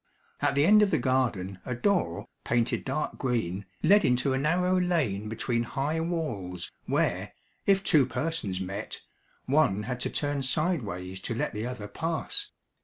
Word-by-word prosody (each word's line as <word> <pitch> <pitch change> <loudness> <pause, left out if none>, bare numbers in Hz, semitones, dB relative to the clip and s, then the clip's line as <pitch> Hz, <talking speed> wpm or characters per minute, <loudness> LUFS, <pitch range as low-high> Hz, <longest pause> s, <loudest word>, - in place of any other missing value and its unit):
At - - +2
the 140 +1 +4
end 210 +4 +7
of 210 - +4
the 160 - +2
garden 120 -8 0
a 125 - -3
door, 120 - 0 0.2
painted 120 0 +1
dark 135 +3 -2
green, 100 -7 -1 0.2
led 205 +1 +6
into 125 +2 +2
a 130 - +1
narrow 180 +5 +2
lane 130 - 0
between 115 +1 0
high 140 +6 -1
walls, 115 - -3
where, - - 0 0.3
if 195 0 +4
two 150 -9 +4
persons 130 - -2
met, 100 +3 -5 0.4
one 130 -8 +3
had 125 +3 -3
to - - -1
turn 145 -1 -1
sideways 115 - -1
to 115 - -4
let - - -1
the 110 +2 -3
other 125 -5 -5
pass. 165 - -1
130 Hz, 160 wpm, -28 LUFS, 105-160 Hz, 0.4 s, end